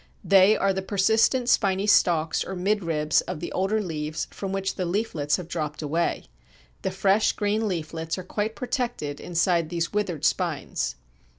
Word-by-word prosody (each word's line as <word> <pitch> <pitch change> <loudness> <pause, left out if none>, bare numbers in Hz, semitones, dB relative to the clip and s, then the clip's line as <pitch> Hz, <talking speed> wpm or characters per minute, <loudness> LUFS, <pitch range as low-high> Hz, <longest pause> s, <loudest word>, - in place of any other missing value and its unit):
They 195 +2 +6
are 195 0 +2
the 190 - -2
persistent 220 +6 +2
spiny 195 -5 +2
stalks 165 -6 +3
or 190 - -6
midribs 170 -6 +1
of 180 -4 -4
the - - -5
older 195 +4 0
leaves 155 -3 -4
from 195 -1 -5
which 195 0 -1
the 185 - -3
leaflets 170 -7 0
have 180 -3 -7
dropped 155 -3 -4
away. 165 +4 -1 0.6
The - - -1
fresh 195 +3 +2
green 215 +1 0
leaflets 165 -2 -3
are 185 - -5
quite 210 +4 -3
protected 245 - -3
inside 170 -1 +1
these 170 +1 -2
withered 180 -8 -1
spines. - - -1
185 Hz, 160 wpm, -25 LUFS, 165-205 Hz, 0.6 s, They